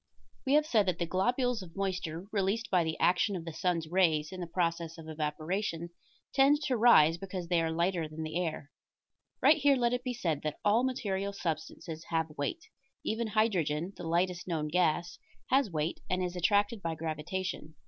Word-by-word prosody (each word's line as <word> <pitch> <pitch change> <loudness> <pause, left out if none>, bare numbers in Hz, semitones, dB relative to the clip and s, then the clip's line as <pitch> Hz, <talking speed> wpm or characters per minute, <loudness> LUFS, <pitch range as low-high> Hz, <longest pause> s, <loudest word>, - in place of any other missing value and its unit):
We 270 - +3
have 300 +1 +5
said 215 -9 +2
that 170 -2 -1
globules 245 +4 +1
of 170 -3 -11
moisture, 185 -3 -3
released 205 +3 0
by 180 -3 +4
the 160 -1 -2
action 180 +3 +3
of 170 -2 -5
the 165 - -6
sun's 165 -1 -1
rays 160 -4 +2
in 185 - -7
the 175 - -4
process 170 -1 -1
of 160 -1 -10
evaporation, 160 +3 -3 0.4
tend 285 +2 +4
to 265 -4 +1
rise 170 -9 +6
because 185 -2 -5
they 175 -2 +3
are 165 - 0
lighter 170 0 0
than 155 +1 -6
the 160 +3 -2
air. 155 -3 -5 0.7
Right 315 - +7
here 285 -1 +4
let 240 -1 +1
it 245 0 -1
be 250 -1 -3
said 165 -10 -1
that 155 -1 -3
all 215 +4 +4
material 200 -6 -1
substances 160 -2 -5
have 160 -2 -2
weight; 320 - -3 0.4
even 225 +1 -1
hydrogen, 190 -6 0
the 175 - -7
lightest 175 +2 0
known 155 -4 -1
gas, 175 0 +1 0.3
has 270 -3 +4
weight, 160 -1 -2
and 185 0 0
is 180 0 -3
attracted 205 +4 +2
by 165 -2 -2
gravitation. 160 +1 -4
180 Hz, 185 wpm, -31 LUFS, 160-205 Hz, 0.7 s, Right